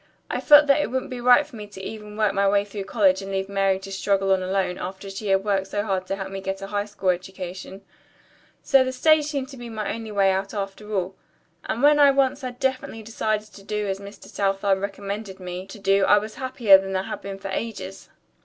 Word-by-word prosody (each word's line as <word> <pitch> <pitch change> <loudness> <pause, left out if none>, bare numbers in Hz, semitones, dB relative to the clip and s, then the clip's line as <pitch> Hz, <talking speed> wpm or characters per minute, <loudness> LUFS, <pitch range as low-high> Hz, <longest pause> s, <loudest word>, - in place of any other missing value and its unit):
I - - -2
felt 295 -1 +8
that 285 +1 +4
it - - -2
wouldn't 260 +1 -3
be 250 -1 -5
right 250 +4 +6
for 290 -4 -14
me 210 -2 -8
to 205 -2 -12
even 210 +1 -8
work 215 -2 +2
my 200 0 +2
way 200 0 +2
through 200 -1 -6
college 195 -2 +2
and 195 0 -7
leave 190 0 -2
Mary 195 -1 +1
to 195 +1 -9
struggle 195 0 +1
on 190 - +1
alone, 185 -1 -1
after 195 +1 -6
she 200 +2 -6
had 195 0 +2
worked 195 -2 0
so 205 +1 -2
hard 190 -3 -2
to 195 - -1
help 195 -1 -6
me 195 0 -5
get 195 0 -3
a - - -3
high 205 0 -2
school 205 -2 -2
education. 185 +1 -7 0.8
So 270 -2 +5
the 260 0 -3
stage 310 +3 +4
seemed 280 -3 -3
to 270 - -10
be 240 -1 -8
my 215 -2 -3
one 220 -2 -6
way 195 -1 +4
out 195 +2 -2
after 200 +1 -5
all. 190 -2 -1 0.5
And 240 - -2
when 295 +1 +6 0.2
once 270 0 +1
I - - -2
had 245 0 -9
definitely 255 -4 -2
decided 215 -1 -2
to 200 - -12
do 210 +1 -3
as 195 0 -2
Mr. 200 +1 -11
Southard 195 0 0
recommended 200 0 -5
me 180 +1 -6
to 195 - -10
do 195 0 +2
I 205 - +6
was 215 +1 -3
happier 245 -7 +5
than 195 0 -4
I 185 - 0
had - - -6
been 195 -1 -6
for 195 0 -7
ages." 195 -2 -5
200 Hz, 240 wpm, -24 LUFS, 195-220 Hz, 0.8 s, felt